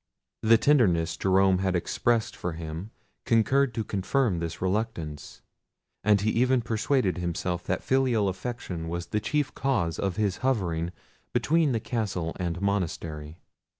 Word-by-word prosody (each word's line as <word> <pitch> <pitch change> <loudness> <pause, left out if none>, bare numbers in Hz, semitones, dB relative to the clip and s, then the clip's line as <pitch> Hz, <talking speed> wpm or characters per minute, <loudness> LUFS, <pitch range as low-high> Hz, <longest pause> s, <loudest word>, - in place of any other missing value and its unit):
The 115 +1 +6
tenderness 90 - +3
Jerome 95 -1 +3
had 95 -1 0
expressed 115 +6 0
for 90 - -4
him 80 +4 -6 0.3
concurred 125 +4 +3
to 115 - -1
confirm 105 0 0
this 85 0 -4
reluctance; 90 - -3 0.6
and 105 0 +4
he 110 +2 +1
even 125 +1 +2
persuaded 115 -4 +1
himself 90 0 -2
that 90 - -1
filial 130 -6 +2
affection 95 -4 -4
was 85 +1 -3
the 105 +5 -1
chief 145 +5 -1
cause 90 - 0
of 95 -2 -1
his 105 -3 0
hovering 90 -10 0 0.4
between 160 -2 +2
the 115 - +1
castle 100 -8 -2
and 90 -1 -2
monastery. 80 -5 -2
95 Hz, 140 wpm, -27 LUFS, 85-115 Hz, 0.6 s, The